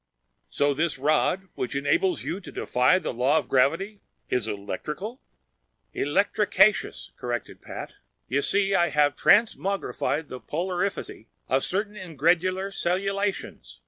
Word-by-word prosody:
"So 145 0 +1
this 160 +2 0
rod, 155 +7 +1
which 130 +2 -4
enables 145 +7 +1
you 180 - -3
to 200 - -11
defy 125 +9 +2
the 185 - -3
law 130 +6 +2
of 155 - -1
gravity, 185 +11 +1 0.3
is 125 -3 0
electrical?" 150 - -5 0.7
"Electricaceous," 200 +5 +2
corrected 120 -2 -4
Pat. - - -8 0.3
"You 140 +2 +1
see, 195 +4 +1
I 175 -2 +3
have 145 -1 +3
transmogrified 195 -7 +2
the 130 - -7
polarifity 180 - -3 0.2
of 135 +1 +1
certain 205 +3 -2
ingredular 185 +2 0
cellulations. 195 +3 -2
175 Hz, 120 wpm, -26 LUFS, 140-195 Hz, 0.7 s, I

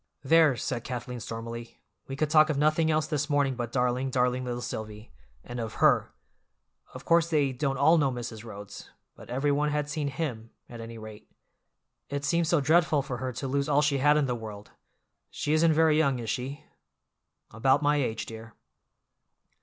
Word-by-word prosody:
"There!" 155 -1 +5
said 120 +1 -3
Kathleen 125 -1 -5
stormily, 115 0 -7 0.3
"we 135 - -5
could 150 +2 -1
talk 155 0 +6
of 150 - 0
nothing 155 +2 +2
else 155 -1 +2
this 150 -1 -2
morning 145 -2 +2
but 120 -2 -5
darling, 125 +1 0
darling 125 0 +1
little 120 -1 -3
Silvy, 110 0 -7 0.3
and 120 0 -7
of 115 -2 -5
her. - - +3 0.8
Of - - -9
course 170 0 +3
they 145 -4 +2
don't 135 +1 -1
all 160 +5 +5
know 140 -3 +2
Mrs. 120 -3 -6
Rhodes, 100 -3 -10 0.3
but - - -14
every 135 +4 0
one 145 +1 +1
had 150 0 -1
seen 150 -1 -2
him, 135 -6 -4 0.2
at 120 -1 -9
any 115 0 -8
rate. 110 -1 -11 0.8
It 140 0 -3
seems 170 +1 +1
so 170 - +3
dreadful 155 0 +3
for 130 -3 -5
her 130 +1 -3
to 135 +3 -4
lose 140 +2 -1
all 145 +1 +3
she 140 -2 +1
had 145 +2 +4
in 150 - +2
the 125 - -1
world! 110 -3 -8 0.6
She 150 - -2
isn't 160 +1 +4
very 155 -1 +4
young, 140 -5 +2
is 115 -2 -3
she?" 135 +2 -5 0.9
"About 130 +6 +2
my 145 +1 +3
age, 115 -6 -2
dear." 110 0 -10
135 Hz, 185 wpm, -28 LUFS, 120-150 Hz, 0.9 s, talk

